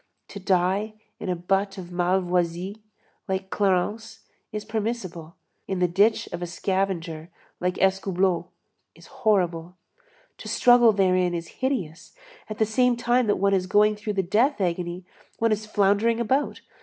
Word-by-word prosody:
To 200 - -8
die 190 +3 0 0.2
in 200 - -5
a 180 - 0
butt 195 +3 -1
of 180 -2 -8
Malvoisie, 180 +2 -1 0.5
like 190 0 -3
Clarence, 210 +3 -1 0.3
is 210 -1 -5
permissible; 205 -7 -4 0.3
in 190 - -2
the 180 0 +2
ditch 200 +6 +2
of 175 - -5
a 175 - -3
scavenger, 175 -3 -2 0.3
like 180 +1 -1
Escoubleau, 190 -1 +1 0.5
is - - -16 0.2
horrible. 180 -6 +1 0.6
To - - -9
struggle 245 -2 +5
therein 185 -3 +2
is 165 -1 -5
hideous; 195 - -3 0.3
at 215 - -5
the 220 - +3
same 245 +2 +2
time 240 0 +2
that 205 - +2
one 200 +1 +2
is 185 -1 +1
going 210 +2 +4
through 210 0 -4
the 195 -1 0
death 225 - +2
agony, 175 -1 -2 0.3
one 230 0 +1
is 215 0 -1
floundering 210 +3 +2
about. 265 +5 0
195 Hz, 150 wpm, -25 LUFS, 180-215 Hz, 0.6 s, struggle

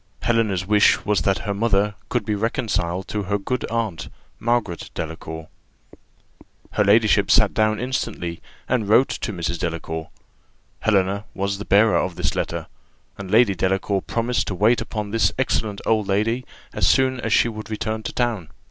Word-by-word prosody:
Helena's 110 -6 +1
wish 105 +1 +4
was, 105 -4 +2
that 95 +3 +1
her 100 - -1
mother 105 -1 +1 0.2
could 120 -4 -1
be 105 - 0
reconciled 100 -5 -1
to 105 - -2
her 100 +1 -1
good 125 +5 -3
aunt, 110 -7 -3 0.3
Margaret 120 -7 -1
Delacour. 80 0 -6 1.2
Her - - +2
ladyship 105 0 +4
sat 110 -4 +5
down 110 -1 +2
instantly, 115 -9 -3 0.3
and 115 -5 0
wrote 125 +5 +5
to 110 - -3
Mrs. 85 -3 -3
Delacour. 80 -1 -4 0.7
Helena 100 -1 +1
was 100 0 -2
the 105 - -6
bearer 105 +3 +4
of 90 - -1
this - - -1
letter, - - -3 0.5
and 95 -1 -6
Lady 110 0 +5
Delacour 95 +2 0
promised 120 +1 -1
to 95 - -2
wait 110 +6 +3
upon 105 -2 -4
this 115 +1 +2
excellent 110 -5 -1
old 110 -3 +1
lady 115 +6 0 0.3
as - - +1
soon 130 -1 +3
as 115 -2 -3
she - - +5
should 110 -2 -5
return 110 0 -3
to 100 - -5
town. 115 -10 -1
105 Hz, 165 wpm, -22 LUFS, 95-115 Hz, 1.2 s, sat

